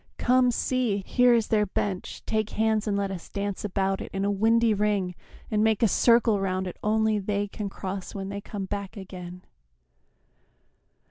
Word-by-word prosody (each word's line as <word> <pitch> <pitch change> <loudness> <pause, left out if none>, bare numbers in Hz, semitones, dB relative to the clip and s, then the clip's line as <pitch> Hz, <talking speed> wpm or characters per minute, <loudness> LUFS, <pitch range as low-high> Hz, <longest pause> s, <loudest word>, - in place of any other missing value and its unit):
Come, 250 0 +4
see, 235 -4 0
Here 245 -1 +4
is 225 -2 0
their 210 -1 +2
bench, 190 -1 -3
take 215 -1 0
hands 220 0 +1
and 200 -1 +1
let 200 -1 -1
us 180 -3 -7
dance 200 -1 -3
About 195 -1 -1
it - - -6
in 195 0 -2
a 205 - +1
windy 225 +2 +3
ring 205 -3 0 0.4
and 215 0 +2
make 220 0 +2
A - - +6
circle 230 0 +4
round 190 -1 -1
it 180 - -6
only 220 0 +2
they 205 +1 -1
can 205 0 -5
cross 190 0 -6
When 195 -1 -4
they 200 0 -5
come 200 -1 -5
back 200 +2 -5
again!" 180 -2 -9
205 Hz, 180 wpm, -26 LUFS, 195-220 Hz, 0.4 s, A